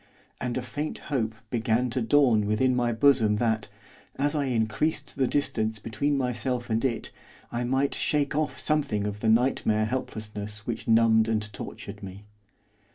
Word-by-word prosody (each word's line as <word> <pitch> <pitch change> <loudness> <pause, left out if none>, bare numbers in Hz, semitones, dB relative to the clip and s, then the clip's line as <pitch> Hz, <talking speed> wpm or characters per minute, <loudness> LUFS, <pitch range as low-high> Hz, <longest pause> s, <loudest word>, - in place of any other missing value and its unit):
And 125 0 -2
a 130 - -2
faint 145 +5 -4 0.2
hope 110 -4 0 0.2
began 120 +1 +1
to 130 - -1
dawn 115 -4 +4
within 125 +5 +2
my 120 -1 +1
bosom 115 -3 +4
that, 110 -1 0 0.5
as 145 +2 0
I 145 -2 0
increased 115 +4 -1
the 130 -2 +1
distance 110 -5 0
between 115 +7 -1
myself 125 -1 -2
and 110 +1 +1
it, 125 -4 -1 0.4
I 120 +1 -2
might 135 +3 +1
shake 145 -1 0
off 155 0 -1
something 140 -10 0
of 105 0 -4
the 110 - +1
nightmare 110 -2 +2
helplessness 105 -3 -4
which 115 - -4
numbed 115 -1 +5
and 105 -1 -1
tortured 100 0 -8
me. 100 +1 -9
115 Hz, 160 wpm, -27 LUFS, 110-130 Hz, 0.5 s, numbed